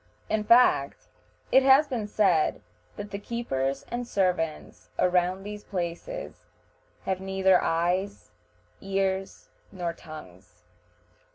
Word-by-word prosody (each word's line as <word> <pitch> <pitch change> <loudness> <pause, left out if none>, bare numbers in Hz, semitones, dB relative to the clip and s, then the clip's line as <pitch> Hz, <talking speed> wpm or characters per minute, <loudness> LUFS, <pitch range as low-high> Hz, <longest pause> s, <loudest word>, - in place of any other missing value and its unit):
In 220 -1 0
fact, 220 - +4 0.5
it 265 - +7
has 270 +3 +6
been 230 -5 -3
said 190 -7 +2 0.3
that 205 0 -7
the 200 - -4
keepers 140 - -2
and 240 0 -3
servants 180 -7 -2
around 180 +1 +2
these 210 0 -7
places 185 - -5 0.6
have 190 -1 -2
neither 190 -1 +3
eyes, 180 +5 -1 0.5
ears, 195 0 -2 0.2
nor 175 -3 -3
tongues. 100 - -13
190 Hz, 105 wpm, -27 LUFS, 170-210 Hz, 0.6 s, it